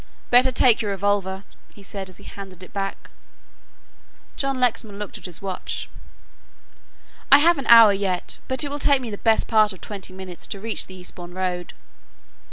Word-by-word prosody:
"Better 250 +2 +6
take 250 -2 +3
your 210 - -2
revolver," 195 -1 -1 0.3
he 200 - -14
said 195 -1 -6
as 185 - -15
he - - -15
handed 190 -2 -10
it - - -13
back. 195 -1 -5 1.2
John 275 -1 -2
Lexman 225 -4 0
looked 210 -1 -6
at - - -8
his 180 +2 -9
watch. 190 -2 -5 1.4
"I 280 - +11
have 330 +1 +4
an 275 - -6
hour 230 -3 +9
yet, 195 -2 -2
but 260 +2 -1
it 285 - -4
will 290 - -3
take 280 -1 +3
me 240 -4 -6
the 205 - -6
best 225 -1 +2
part 215 -2 +4
of 185 - -14
twenty 200 -3 -8
minutes 185 -2 -8
to 200 - -5
reach 225 +2 -2
the 185 - -11
Eastbourne 180 -1 -10
Road." 180 -1 -3
200 Hz, 180 wpm, -23 LUFS, 190-235 Hz, 1.4 s, I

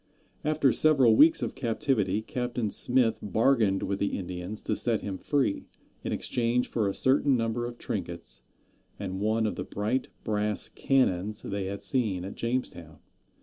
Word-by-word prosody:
After 150 -3 +2
several 135 -5 +5
weeks 155 +7 +6
of - - -3
captivity 110 -4 0
Captain 120 -3 -3
Smith 125 -3 +3
bargained 110 -1 +2
with 100 0 -2
the 100 - -1
Indians 90 +2 -6
to - - 0
set 115 -3 +1
him 95 -2 -5
free, 140 -8 0 0.4
in - - -3
exchange 120 +1 0
for 110 -3 -1
a 100 - -1
certain 135 0 +3
number 115 +1 -1
of 120 0 -8
trinkets - - -5 0.6
and 95 -1 -5
one 110 +1 +1
of 105 - -2
the - - -3
bright 110 +6 -2 0.2
brass 105 -1 -1
cannons 105 -6 +1
they 100 -1 -3
had 100 +1 -5
seen 105 -9 0
at 100 - -6
Jamestown. 115 -10 -4
110 Hz, 155 wpm, -28 LUFS, 100-125 Hz, 0.6 s, weeks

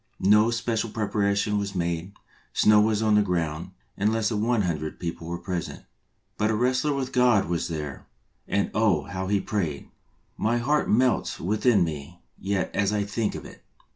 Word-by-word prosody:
No 105 +3 +6
special 115 -1 -1
preparation 105 -1 0
was 100 -1 -4
made; 85 +1 -2 0.4
snow 105 0 +5
was 110 0 +1
on 110 -1 +3
the 105 - +5
ground, 85 -3 -2 0.3
and 105 +2 +1
less 110 -1 +1
than 105 -3 -1
one 115 -1 +2
hundred 80 -3 -3
people 85 -1 -5
were 85 +1 -3
present. 90 -1 -5 0.5
But 105 - +2
a 110 - +1
wrestler 130 +6 +1
with 135 -1 -3
God 125 -5 +4
was 85 -1 -1
there, 75 -4 -6 0.4
and 100 - 0
oh, 105 -9 +2
how 95 +4 -5
he 100 0 +2
prayed! 85 -10 -3 0.5
My 115 +2 +1
heart 145 +5 +1
melts 125 +1 +2
within 105 +2 +2
me 80 +1 -6 0.2
yet 95 -1 -1
as 100 0 +1
I 105 -1 0
think 105 +2 -2
of - - -7
it. - - -13
100 Hz, 175 wpm, -26 LUFS, 90-110 Hz, 0.5 s, No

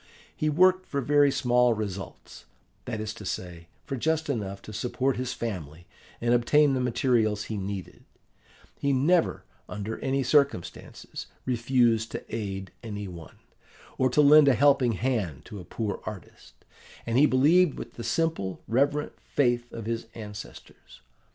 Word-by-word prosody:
He 155 - 0
worked 185 +4 +4
for 140 - -2
very 145 +1 +4
small 125 -2 +3
results; 100 - -7 0.4
that 115 -4 -4
is 110 0 -4
to 105 - -11
say, 85 -3 -6 0.2
for 135 - -3
just 160 +3 0
enough 100 -6 -4
to 110 - -9
support 125 +4 -1
his 125 0 -3
family 85 -8 -6 0.3
and 120 +1 +1
obtain 140 +4 +4
the 130 - 0
materials 115 -4 +1
he 110 - -5
needed; 100 -2 -6 0.8
he 140 0 +1
never, 160 +6 +2 0.3
under 105 +2 -5
any 135 0 0
circumstances, 140 - -1 0.2
refused 120 -2 +2
to - - -6
aid 95 -4 -5
any 105 -3 -6
one, 85 -3 -11 0.6
or 130 - +3
to 140 +4 +3
lend 150 0 +7
a 135 - +5
helping 135 -2 +4
hand 105 - -2
to 105 -3 -9
a - - -8
poor 105 0 -4
artist; 105 -4 -10 0.5
and 115 +2 +1
he 150 - +6
believed 150 +5 +4
with - - -8
the 115 - -8
simple, 160 - -1
reverent 140 +5 +1
faith 120 -3 0
of 115 -2 -7
his 115 0 -3
ancestors. 105 -1 -11
120 Hz, 150 wpm, -27 LUFS, 105-140 Hz, 0.8 s, lend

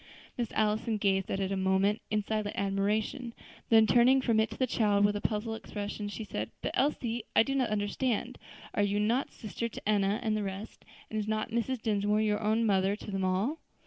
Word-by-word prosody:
Miss 240 -4 -3
Allison 215 +1 +1
gazed 195 -2 +1
at 195 - -1
it 195 0 -1
a - - 0
moment 190 +2 +2
in 210 -1 0
silent 215 0 -2
admiration; 210 +5 -1 0.3
then 225 -1 +7
turning 245 +4 +5
from 230 -4 +2
it 220 -1 +2
to 220 - -9
the 260 - +2
child 205 -4 +2
with 205 0 +2
a 205 - -2
puzzled 220 +1 -2
expression, 205 -1 -5
she 220 - -5
said, 110 - -4
"But, - - -1
Elsie, 240 -5 0
I - - +7
do 270 - -2
not 260 -3 +1
understand; 210 +3 -1 0.3
are - - +1
you 205 0 +1
not 230 +6 +1
sister 230 +2 -5
to 215 - -8
Enna 205 0 +2
and 220 -2 +1
the 215 - -1
rest, 195 +1 -6 0.3
and 220 - -1
is 210 - -3
not 215 +1 -1
Mrs. 235 +1 -1
Dinsmore 210 0 +1
own 220 +2 +2
mother 195 -1 +2
to 210 - -8
them 195 -1 -1
all?" 195 - 0
215 Hz, 210 wpm, -30 LUFS, 205-225 Hz, 0.3 s, then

